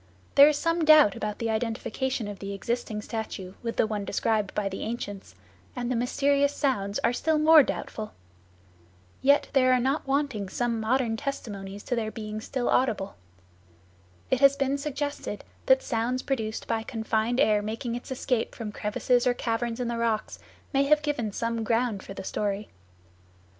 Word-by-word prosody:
There 285 Hz, +1 st, +9 dB
is 300 Hz, -, 0 dB
some 330 Hz, +2 st, 0 dB
doubt 310 Hz, -9 st, +7 dB
about 210 Hz, -1 st, -3 dB
the 230 Hz, -1 st, -1 dB
identification 230 Hz, +2 st, -2 dB
of 205 Hz, -1 st, -7 dB
the 200 Hz, 0 st, -5 dB
existing 220 Hz, 0 st, -3 dB
statue 205 Hz, -5 st, -5 dB
with 230 Hz, -1 st, -3 dB
the -, -, +4 dB
one 210 Hz, -2 st, -3 dB
described 210 Hz, 0 st, 0 dB
by 205 Hz, -1 st, 0 dB
the 195 Hz, 0 st, -5 dB
ancients, 205 Hz, -, -5 dB, 0.4 s
and 245 Hz, 0 st, -2 dB
the -, -, +1 dB
mysterious 280 Hz, +4 st, +2 dB
sounds 205 Hz, -8 st, 0 dB
are 240 Hz, -, +3 dB
still 315 Hz, +5 st, +1 dB
more 310 Hz, +1 st, +8 dB
doubtful. 215 Hz, -5 st, -4 dB, 1.1 s
Yet 280 Hz, +2 st, +4 dB
there 255 Hz, -2 st, +4 dB
are 255 Hz, -, +4 dB
not 270 Hz, +4 st, 0 dB
wanting 270 Hz, -8 st, 0 dB
some 235 Hz, +3 st, -1 dB
modern 225 Hz, 0 st, +1 dB
testimonies 205 Hz, -7 st, -5 dB
to 245 Hz, -, -1 dB
their 225 Hz, -2 st, -1 dB
being 215 Hz, -1 st, -6 dB
still 250 Hz, +2 st, -3 dB
audible. 210 Hz, -6 st, +1 dB, 1.2 s
It 260 Hz, -, +3 dB
has 275 Hz, 0 st, +6 dB
been 275 Hz, 0 st, 0 dB
suggested 290 Hz, 0 st, -4 dB, 0.2 s
that -, -, +5 dB
sounds 245 Hz, -, -1 dB
produced 220 Hz, -6 st, -2 dB
by 225 Hz, -1 st, -1 dB
confined 225 Hz, +1 st, -1 dB
air 215 Hz, -7 st, +4 dB
making 225 Hz, +3 st, -4 dB
its 240 Hz, -, -6 dB
escape 250 Hz, -2 st, -1 dB
from 220 Hz, -3 st, -5 dB
crevices 240 Hz, +5 st, +1 dB
or 245 Hz, -, +3 dB
caverns 230 Hz, 0 st, -2 dB
in 245 Hz, -, -1 dB
the 235 Hz, 0 st, -2 dB
rocks 225 Hz, -2 st, -1 dB, 0.3 s
may 275 Hz, 0 st, +3 dB
have 300 Hz, +1 st, +4 dB
given 265 Hz, -8 st, -1 dB
some 230 Hz, +2 st, -2 dB
ground 225 Hz, -2 st, 0 dB
for 195 Hz, -, -9 dB
the -, -, -6 dB
story. 205 Hz, +1 st, -2 dB
235 Hz, 170 wpm, -27 LUFS, 215-270 Hz, 1.2 s, There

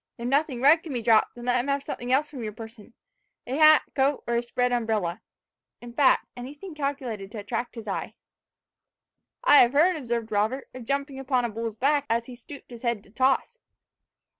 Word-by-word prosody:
If 235 Hz, 0 st, -5 dB
nothing 270 Hz, -2 st, 0 dB
red 310 Hz, +4 st, +6 dB
can 315 Hz, -4 st, -7 dB
be 240 Hz, -2 st, -3 dB
dropped, 220 Hz, -1 st, +3 dB
then 240 Hz, 0 st, -9 dB
let 250 Hz, 0 st, +2 dB
him 245 Hz, -, -3 dB
have 280 Hz, 0 st, 0 dB
something 245 Hz, -2 st, -5 dB
else 290 Hz, +3 st, +2 dB
from 270 Hz, -5 st, -7 dB
your 215 Hz, -1 st, -5 dB
person 225 Hz, +1 st, -12 dB, 0.5 s
a 255 Hz, -, -3 dB
hat, 310 Hz, 0 st, +7 dB
coat, 275 Hz, +1 st, +1 dB
or 235 Hz, -, -2 dB
a 235 Hz, -, +2 dB
spread 245 Hz, +1 st, -1 dB
umbrella 220 Hz, -7 st, -1 dB, 0.6 s
in 240 Hz, 0 st, -11 dB
fact 265 Hz, +1 st, +3 dB
anything 290 Hz, +9 st, -9 dB
calculated 265 Hz, -9 st, -4 dB
to -, -, -6 dB
attract 225 Hz, +4 st, -4 dB
his 225 Hz, -2 st, -8 dB
eye." 195 Hz, -, -4 dB, 1.3 s
"I -, -, +7 dB
have 245 Hz, -1 st, +6 dB
heard," 340 Hz, +6 st, +4 dB
observed 235 Hz, -6 st, -3 dB
Robert, 215 Hz, +6 st, 0 dB
"of 250 Hz, -2 st, -9 dB
jumping 275 Hz, +1 st, -2 dB
upon 260 Hz, -2 st, 0 dB
a -, -, -2 dB
bull's 225 Hz, 0 st, -5 dB
back, 285 Hz, +4 st, +1 dB
as 230 Hz, +1 st, 0 dB
he 250 Hz, -, -10 dB
stooped 255 Hz, +3 st, -13 dB
his 235 Hz, -1 st, -10 dB
head 235 Hz, -4 st, -1 dB
to 200 Hz, -, -21 dB
toss." 265 Hz, -, +1 dB
245 Hz, 200 wpm, -26 LUFS, 230-280 Hz, 1.3 s, hat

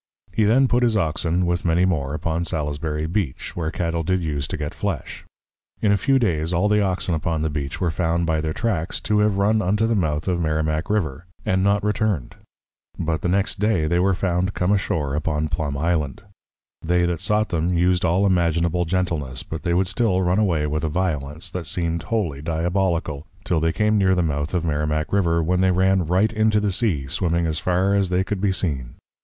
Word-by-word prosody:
He 110 Hz, -, +2 dB
then 130 Hz, +6 st, +4 dB
put 125 Hz, 0 st, +2 dB
his 115 Hz, -3 st, +2 dB
Oxen, 85 Hz, 0 st, 0 dB
with 85 Hz, +1 st, 0 dB
many 85 Hz, +1 st, +3 dB
more, 75 Hz, -6 st, -1 dB
upon 80 Hz, +2 st, -1 dB
Salisbury 75 Hz, -1 st, -2 dB
Beach, 85 Hz, -5 st, -3 dB
where 80 Hz, -3 st, -2 dB
Cattle 85 Hz, -1 st, -2 dB
did 95 Hz, +3 st, 0 dB
use 70 Hz, -3 st, -2 dB
to -, -, -4 dB
get 75 Hz, -1 st, -4 dB
Flesh. 95 Hz, -9 st, -4 dB, 0.5 s
In 105 Hz, -, +2 dB
a -, -, +5 dB
few 135 Hz, +6 st, +2 dB
days, 85 Hz, -9 st, 0 dB
all 90 Hz, +4 st, +2 dB
the 105 Hz, 0 st, +3 dB
Oxen 95 Hz, -2 st, 0 dB
upon 80 Hz, -1 st, -1 dB
the 80 Hz, -, -1 dB
Beach 70 Hz, -2 st, -4 dB
were 90 Hz, -3 st, +1 dB
found 85 Hz, 0 st, 0 dB
by 80 Hz, -1 st, 0 dB
their 80 Hz, 0 st, -2 dB
Tracks, 90 Hz, -4 st, -1 dB
to 105 Hz, -1 st, +1 dB
have 105 Hz, -2 st, +2 dB
run 105 Hz, +2 st, +2 dB
unto 105 Hz, +3 st, +1 dB
the 115 Hz, -, +1 dB
Mouth 80 Hz, -6 st, -1 dB
of 90 Hz, -2 st, 0 dB
Merrimack 80 Hz, +2 st, -1 dB
River, 85 Hz, -6 st, -1 dB, 0.2 s
and 95 Hz, 0 st, +1 dB
not 100 Hz, +1 st, +2 dB
returned; 105 Hz, -, -1 dB, 0.6 s
but 80 Hz, -1 st, -1 dB
the -, -, -1 dB
next 95 Hz, +3 st, 0 dB
day 105 Hz, -6 st, +2 dB
they 85 Hz, +3 st, +1 dB
were 95 Hz, +1 st, +2 dB
found 95 Hz, +1 st, -1 dB
come 90 Hz, +2 st, +1 dB
ashore 80 Hz, -8 st, 0 dB
upon 75 Hz, +1 st, -1 dB
Plum 75 Hz, -2 st, -2 dB
Island. 75 Hz, -3 st, -1 dB, 0.6 s
They 90 Hz, +1 st, +2 dB
that 85 Hz, -2 st, -1 dB
sought 105 Hz, +2 st, +1 dB
them, 85 Hz, +2 st, 0 dB
used 90 Hz, +1 st, +2 dB
all 90 Hz, +4 st, +2 dB
imaginable 85 Hz, -1 st, +1 dB
gentleness, 80 Hz, -7 st, -2 dB
but 80 Hz, -1 st, -6 dB
they 85 Hz, 0 st, 0 dB
would 95 Hz, +1 st, +2 dB
still 95 Hz, -3 st, +1 dB
run 90 Hz, +3 st, +2 dB
away 85 Hz, -8 st, +1 dB
with 75 Hz, +1 st, -2 dB
a 80 Hz, -, 0 dB
violence, 80 Hz, -1 st, -2 dB
that 85 Hz, -3 st, -5 dB
seemed 85 Hz, -1 st, -1 dB
wholly 85 Hz, -7 st, -2 dB
Diabolical, 85 Hz, -1 st, -1 dB, 0.2 s
till 85 Hz, -3 st, +1 dB
they 80 Hz, +1 st, +1 dB
came 105 Hz, +3 st, +2 dB
near 95 Hz, -1 st, +3 dB
the 90 Hz, -, +1 dB
mouth 75 Hz, +1 st, -2 dB
of 85 Hz, -1 st, 0 dB
Merrimack 75 Hz, +1 st, -1 dB
River; 85 Hz, -4 st, +2 dB
when 90 Hz, +3 st, +1 dB
they 95 Hz, -, +4 dB
ran 95 Hz, -1 st, +2 dB
right 95 Hz, +6 st, +2 dB
into 110 Hz, -1 st, +2 dB
the 105 Hz, -1 st, 0 dB
Sea, 90 Hz, -, 0 dB
swimming 85 Hz, +4 st, 0 dB
as 80 Hz, -1 st, -1 dB
far 95 Hz, +2 st, +1 dB
as 100 Hz, -2 st, +2 dB
they 90 Hz, +1 st, +1 dB
could 100 Hz, -1 st, -3 dB
be 100 Hz, -1 st, +2 dB
seen. 70 Hz, -10 st, -3 dB
85 Hz, 210 wpm, -22 LUFS, 80-95 Hz, 0.6 s, a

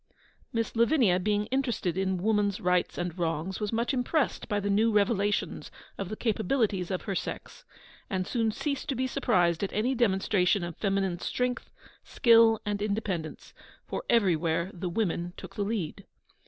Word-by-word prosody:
Miss 230 Hz, 0 st, -2 dB
Lavinia 230 Hz, -, +4 dB
being 210 Hz, +2 st, 0 dB
interested 240 Hz, -10 st, 0 dB
in 190 Hz, 0 st, 0 dB
Woman's 205 Hz, 0 st, +1 dB
Rights 180 Hz, -3 st, +1 dB
and 175 Hz, -1 st, -3 dB
Wrongs, 165 Hz, +2 st, -2 dB
was 210 Hz, -1 st, -2 dB
much 235 Hz, +4 st, 0 dB
impressed 265 Hz, +3 st, 0 dB
by 205 Hz, -2 st, +1 dB
the 205 Hz, -, -3 dB
new 220 Hz, +3 st, +3 dB
revelations 205 Hz, -1 st, 0 dB, 0.3 s
of 195 Hz, -2 st, -5 dB
the 215 Hz, -, -4 dB
capabilities 215 Hz, -4 st, 0 dB
of 185 Hz, -2 st, -2 dB
her 195 Hz, -, -3 dB
sex, -, -, -5 dB, 0.4 s
and 185 Hz, -2 st, -1 dB
soon 225 Hz, +1 st, 0 dB
ceased 280 Hz, +4 st, -3 dB
to 275 Hz, -, 0 dB
be 260 Hz, +2 st, 0 dB
surprised 185 Hz, -, +1 dB
at 200 Hz, -, -2 dB
any 235 Hz, +6 st, +1 dB
demonstration 195 Hz, -4 st, +2 dB
of 175 Hz, -1 st, -5 dB
feminine 195 Hz, -3 st, 0 dB
strength, 250 Hz, +4 st, -2 dB, 0.3 s
skill, 230 Hz, -2 st, +5 dB
and 205 Hz, -1 st, -2 dB
independence, 200 Hz, -6 st, -3 dB, 0.3 s
for -, -, -4 dB
everywhere 170 Hz, -5 st, +2 dB
the 180 Hz, 0 st, -4 dB
women 175 Hz, -3 st, -1 dB
took -, -, -9 dB
the 210 Hz, -, -4 dB
lead. 200 Hz, -3 st, -3 dB
205 Hz, 160 wpm, -28 LUFS, 180-230 Hz, 0.4 s, skill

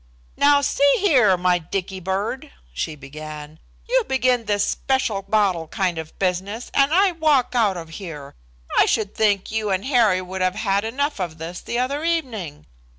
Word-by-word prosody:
"Now, 285 Hz, 0 st, +4 dB
see 280 Hz, 0 st, +3 dB
here, 255 Hz, -, +4 dB
my 180 Hz, 0 st, +2 dB
Dicky 190 Hz, +3 st, -4 dB
bird," 195 Hz, +7 st, -3 dB, 0.2 s
she 105 Hz, -, -3 dB
began, 150 Hz, +2 st, -9 dB, 0.3 s
"you -, -, +2 dB
begin 255 Hz, -3 st, +1 dB
this 205 Hz, -1 st, +1 dB
special 260 Hz, -7 st, -1 dB
bottle 195 Hz, -5 st, +1 dB
kind 180 Hz, -1 st, -1 dB
of 160 Hz, 0 st, -9 dB
business 195 Hz, +5 st, -2 dB
and 275 Hz, +1 st, +3 dB
I 380 Hz, +3 st, +4 dB
walk 305 Hz, -7 st, +2 dB
out 215 Hz, -6 st, +2 dB
of 165 Hz, -1 st, -8 dB
here. 150 Hz, -7 st, -8 dB, 0.5 s
I -, -, +5 dB
should 210 Hz, -3 st, 0 dB
think 205 Hz, -3 st, +1 dB
you 220 Hz, -1 st, -1 dB
and 190 Hz, +1 st, -1 dB
Harry 230 Hz, -9 st, +3 dB
would 185 Hz, +1 st, -6 dB
have 185 Hz, +1 st, +1 dB
had 200 Hz, -2 st, 0 dB
enough 280 Hz, +3 st, -2 dB
of 170 Hz, -4 st, -4 dB
this 165 Hz, +2 st, -7 dB
the 235 Hz, -, -4 dB
other 275 Hz, +5 st, -1 dB
evening. 230 Hz, -, -3 dB
200 Hz, 170 wpm, -22 LUFS, 180-255 Hz, 0.5 s, I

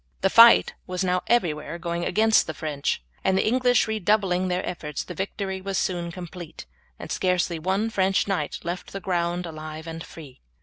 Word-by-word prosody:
The 195 Hz, 0 st, +2 dB
fight 230 Hz, 0 st, +8 dB
was 180 Hz, +1 st, -2 dB
now 180 Hz, 0 st, +1 dB
everywhere 165 Hz, -8 st, 0 dB
going 170 Hz, 0 st, -3 dB
against 220 Hz, +1 st, +3 dB
the 160 Hz, -, -5 dB
French, 145 Hz, -, -2 dB, 0.2 s
and 190 Hz, -, +2 dB
the -, -, +2 dB
English 245 Hz, +1 st, +3 dB
redoubling 200 Hz, -3 st, +1 dB
their 180 Hz, +1 st, -1 dB
efforts 150 Hz, -5 st, -4 dB
the 180 Hz, -, -8 dB
victory 190 Hz, +1 st, -4 dB
was 195 Hz, 0 st, -3 dB
soon 175 Hz, -2 st, -1 dB
complete, 175 Hz, -2 st, -9 dB, 0.3 s
and -, -, -8 dB
scarcely 180 Hz, -2 st, 0 dB
one 195 Hz, +7 st, 0 dB
French 195 Hz, -2 st, +1 dB
knight 180 Hz, -7 st, -1 dB
left 175 Hz, +2 st, -5 dB
the 195 Hz, -, -4 dB
ground 175 Hz, -1 st, -1 dB
alive 155 Hz, -1 st, -7 dB
and 165 Hz, 0 st, -6 dB
free. 145 Hz, -6 st, -12 dB
180 Hz, 175 wpm, -25 LUFS, 165-195 Hz, 0.3 s, fight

